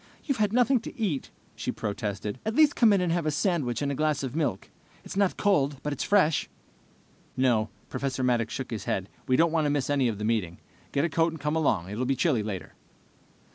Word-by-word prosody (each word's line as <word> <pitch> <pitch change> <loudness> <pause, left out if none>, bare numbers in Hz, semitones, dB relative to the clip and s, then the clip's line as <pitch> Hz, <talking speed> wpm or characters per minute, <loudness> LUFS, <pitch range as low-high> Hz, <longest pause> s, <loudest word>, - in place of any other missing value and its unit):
"You've 275 -6 -1
had 210 -2 +2
nothing 250 +2 +3
to 230 - -10
eat," 180 -12 -1 0.3
she - - -3
protested. 105 +1 -4
"At 220 +1 -2
least 305 -1 +5
come 230 -3 +5
in 200 -2 +3
and 180 -2 +1
have 170 -2 0
a - - +3
sandwich 150 - 0
and 140 - 0
a - - -1
glass 150 0 0
of 130 0 -4
milk. 140 - -2 0.3
It's - - -7
not 200 -2 +2
cold, 145 -9 +2
but 150 - -1
it's 140 - -3
fresh." 185 -7 +3 0.9
"No." 120 -4 +2 0.2
Professor 135 -1 -3
Maddox 120 -3 +1
shook 130 -1 -5
his 110 -4 -4
head. 95 0 -2 0.2
"We 130 - +3
don't 165 +3 +4
want 160 -2 +1
to - - +2
miss 145 -1 0
any 140 -3 +2
of 110 -3 -2
the 105 - -3
meeting. 105 -7 -1 0.3
Get 140 +3 +1
a - - +2
coat 165 +2 +1
and 160 - -8
come 150 +2 -1
along. 140 - +1
It 105 - -5
will 130 - 0
be 135 - +2
chilly 130 -6 +2
later." 105 -3 -5
145 Hz, 230 wpm, -27 LUFS, 120-170 Hz, 0.9 s, least